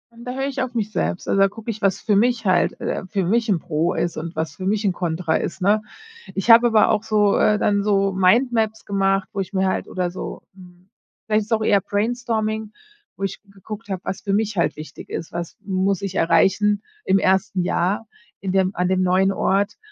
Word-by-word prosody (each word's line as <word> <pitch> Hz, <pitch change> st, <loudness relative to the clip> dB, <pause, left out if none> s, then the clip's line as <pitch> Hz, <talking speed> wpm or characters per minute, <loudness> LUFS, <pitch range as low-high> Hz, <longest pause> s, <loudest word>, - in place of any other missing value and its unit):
Und 235 Hz, +1 st, -12 dB
da 250 Hz, -, -4 dB
höre 270 Hz, +1 st, -2 dB
ich 270 Hz, -1 st, -3 dB
auf 255 Hz, -1 st, -4 dB
mich 215 Hz, -2 st, -1 dB
selbst. 85 Hz, -, -2 dB
Also, 195 Hz, -, +1 dB
da 195 Hz, -, +6 dB
gucke 225 Hz, +3 st, -6 dB
ich, 215 Hz, -, -9 dB
was 195 Hz, -2 st, +1 dB
für 210 Hz, -3 st, +1 dB
mich 230 Hz, +2 st, +2 dB
halt, 185 Hz, -2 st, +2 dB
äh -, -, -3 dB
für 195 Hz, 0 st, -1 dB
mich 225 Hz, +4 st, +1 dB
'n 185 Hz, -, +2 dB
Pro 170 Hz, +1 st, -1 dB
ist 170 Hz, -1 st, -1 dB
und 165 Hz, +2 st, -5 dB
was 160 Hz, -1 st, -3 dB
für 185 Hz, -, -6 dB
mich 205 Hz, +2 st, 0 dB
'n 195 Hz, -, +3 dB
Kontra 165 Hz, -2 st, -1 dB
ist, 180 Hz, -, -5 dB
ne? 210 Hz, +3 st, +3 dB, 0.5 s
Ich 200 Hz, +4 st, +3 dB
habe 235 Hz, +1 st, +8 dB
aber 225 Hz, -2 st, +4 dB
auch 215 Hz, -1 st, +1 dB
so 210 Hz, -2 st, +2 dB
äh, 210 Hz, -, +3 dB
dann 205 Hz, -1 st, +1 dB
so 195 Hz, -1 st, +2 dB
Mindmaps 220 Hz, +3 st, +2 dB
gemacht, 195 Hz, -1 st, +1 dB
wo 200 Hz, -, -3 dB
ich 190 Hz, +1 st, -4 dB
mir 190 Hz, 0 st, +1 dB
halt 185 Hz, -, -1 dB
oder 180 Hz, -1 st, -2 dB
so, 185 Hz, -, -7 dB
hm 180 Hz, 0 st, -17 dB, 0.4 s
vielleicht 215 Hz, -1 st, +1 dB
ist 225 Hz, -, -2 dB
auch 220 Hz, -1 st, +1 dB
eher 205 Hz, -2 st, +4 dB
Brainstorming, 220 Hz, 0 st, -2 dB, 0.4 s
wo 195 Hz, -, -7 dB
ich 195 Hz, 0 st, -3 dB
geguckt 205 Hz, +3 st, -10 dB
habe, 190 Hz, -2 st, -3 dB
was -, -, -4 dB
für 200 Hz, -, -2 dB
mich 210 Hz, 0 st, 0 dB
halt 170 Hz, -, +1 dB
wichtig 155 Hz, +1 st, -10 dB
ist. 165 Hz, -, -5 dB
Was 170 Hz, 0 st, -5 dB
muss 190 Hz, -1 st, 0 dB
ich 195 Hz, -1 st, -4 dB
erreichen 205 Hz, +4 st, +3 dB, 0.2 s
im 195 Hz, -, +4 dB
1. 190 Hz, -1 st, +1 dB
Jahr 190 Hz, +5 st, 0 dB, 0.3 s
in 190 Hz, -, -2 dB
dem 190 Hz, 0 st, +1 dB
an 180 Hz, 0 st, 0 dB
dem 185 Hz, 0 st, +2 dB
neuen 185 Hz, +1 st, +3 dB
Ort? 200 Hz, +1 st, 0 dB
195 Hz, 225 wpm, -22 LUFS, 185-215 Hz, 0.5 s, habe